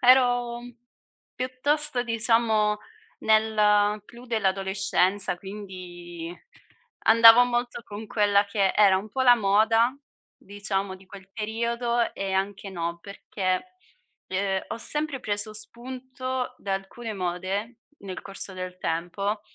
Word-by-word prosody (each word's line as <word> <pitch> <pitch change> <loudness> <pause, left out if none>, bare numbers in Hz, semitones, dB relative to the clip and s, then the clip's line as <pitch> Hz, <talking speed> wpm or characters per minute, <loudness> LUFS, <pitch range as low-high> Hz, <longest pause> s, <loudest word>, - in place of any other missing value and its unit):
ero 245 -2 +4 0.7
piuttosto, 260 +1 0
diciamo, 225 -2 +2 0.4
nel 210 -1 +3
clou 240 +3 -14
dell'adolescenza, 195 -3 0
quindi 175 -3 -8 0.7
andavo 230 +1 +9
molto 240 -1 -2
con 210 +1 -8
quella 205 -1 +3
che 200 -1 +1
era 200 -3 +5
un 205 +3 -8
po' 260 +5 -1
la 245 -1 +8
moda, 225 +3 +3 0.4
diciamo, 195 -1 -3
di 190 0 -16
quel 195 -1 -13
periodo 235 +2 -1
e 195 -1 -3
anche 195 +1 -2
no, 170 -2 -3
perché, 190 -1 -3 0.6
uhm, 190 0 0
ho - - -4
sempre 300 +3 -2
preso 205 0 -1
spunto 255 +3 -5
da 195 -1 -2
alcune 215 +4 -6
mode 190 +5 -3 0.2
nel 190 -2 -7
corso 195 0 -7
del 185 0 -6
tempo, 185 +6 -2
210 Hz, 115 wpm, -26 LUFS, 195-235 Hz, 0.7 s, andavo